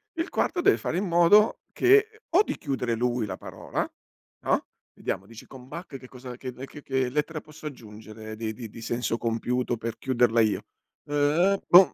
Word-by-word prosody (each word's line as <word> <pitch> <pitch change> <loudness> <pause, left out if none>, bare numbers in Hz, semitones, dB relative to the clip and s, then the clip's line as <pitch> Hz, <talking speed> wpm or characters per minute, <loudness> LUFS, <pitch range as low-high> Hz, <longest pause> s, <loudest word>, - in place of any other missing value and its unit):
Il 330 +2 -2
quarto 355 - 0
deve 405 +3 +5
fare 170 - -2
in 195 - 0
modo 175 +5 +5
che 430 +3 +4
o 395 - +7
di - - -4
chiudere 125 -5 -1
lui 120 0 0
la 105 - -5
parola, - - -4 0.5
no, - - +1 0.3
vediamo, 95 - -3
dici: 115 0 -12
“Con 130 -1 -12
Bach 160 -2 -7
che 130 - -13
cosa 125 -1 -9
che 130 0 -5
mhmm, 125 +2 -8
che 145 +1 -11
che 130 -1 0
lettera 150 +3 -1
posso 155 0 -10
aggiungere 110 -3 -9
di 110 0 -3
di 115 0 -7
di 115 - -11
senso 115 0 -1
compiuto 120 +1 -1
per 115 0 -4
chiuderla 120 -3 +3
io?“ 110 -2 +1 0.4
“Uh-uh, 150 +7 +3
boh, 180 +1 +8
130 Hz, 185 wpm, -27 LUFS, 115-170 Hz, 0.5 s, boh